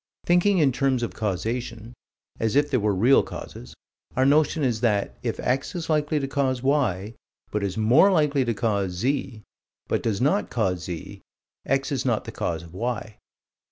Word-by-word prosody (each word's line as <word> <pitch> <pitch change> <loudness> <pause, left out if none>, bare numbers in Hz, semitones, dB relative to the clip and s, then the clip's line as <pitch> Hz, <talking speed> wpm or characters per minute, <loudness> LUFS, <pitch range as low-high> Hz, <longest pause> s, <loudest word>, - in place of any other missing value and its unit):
Thinking 180 +3 +3
in 145 -5 +4
terms 130 -1 0
of 120 - -3
causation 115 +3 -3 0.5
as 110 +1 0
if 145 +1 +3
there 130 - +2
were 105 -2 +1
real 120 +8 +5
causes 60 - -9 0.4
our 130 - +3
notion 150 +2 +3
is 120 -4 0
that, 105 -4 +1
if - - -3
X 135 +7 -1
is 165 -2 -3
likely 150 0 +1
to 135 - -2
cause 135 -2 -1
Y, 115 -8 0 0.4
but 105 - -1
is 100 -1 -3
more 125 - +5
likely 150 -6 +2
to 120 -2 -1
cause 100 -4 0
Z, 120 +2 -2 0.4
but - - 0
does 105 -4 -1
not 185 +11 +1
cause 95 -7 -1
Z, 85 -3 -7 0.5
X 135 +1 0
is 130 -3 -1
not 120 -4 0
the - - -6
cause 80 -1 -3
of 85 0 -13
Y. 110 0 -4
125 Hz, 180 wpm, -25 LUFS, 105-140 Hz, 0.5 s, real